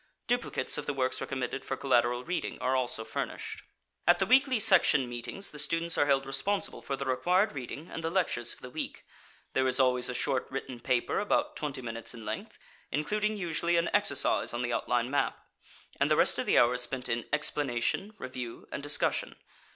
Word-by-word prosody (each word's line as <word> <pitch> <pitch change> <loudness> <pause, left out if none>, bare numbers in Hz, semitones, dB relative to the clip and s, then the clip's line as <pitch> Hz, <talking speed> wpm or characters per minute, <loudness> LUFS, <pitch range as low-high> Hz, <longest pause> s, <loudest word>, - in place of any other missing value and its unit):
Duplicates 245 -9 0
of 150 - -6
the 145 - -1
works 130 -1 0
recommended 135 0 -3
for 135 - -3
collateral 120 -2 +2
reading 175 +5 -3
are 130 +1 +1
also 120 -3 -1
furnished. - - -4 0.5
At 175 - +7
the 195 - +2
weekly 260 +2 +4
section 175 -9 +5
meetings 120 +11 -5
the 150 - -8
students 165 +3 0
are 145 - +3
held 135 -1 +3
responsible 135 +10 -1
for 140 - -3
the 140 - -4
required 180 +11 +2
reading 140 +4 -6
and 165 - -5
the 165 - 0
lectures 165 -10 0
for - - -10
the 125 - -8
week. - - -5 0.5
There 130 0 +2
is 130 +1 +3
always 125 -1 +4
a 125 - -3
short 130 0 0
written 130 -2 -5
paper 125 0 +1
about 295 +8 +1
twenty 140 -4 -4
minutes 115 +1 -4
in 115 -2 -9
length, 110 +1 -5 0.3
including 210 +9 0
usually 170 -2 0
an 170 0 +1
exercise 145 -11 +2
on 120 - -1
the 120 -1 -1
outline 120 +1 0
map, 145 - +1 0.6
and - - +3
the - - +4
rest - - +4
of - - -2
the - - +4
hour 120 +1 +6
is 125 - 0
spent 125 +1 -3
in 120 -1 -2
explanation, 150 - 0
review 125 -2 -7
and - - -4
discussion. 145 +1 0
135 Hz, 195 wpm, -30 LUFS, 125-170 Hz, 0.6 s, At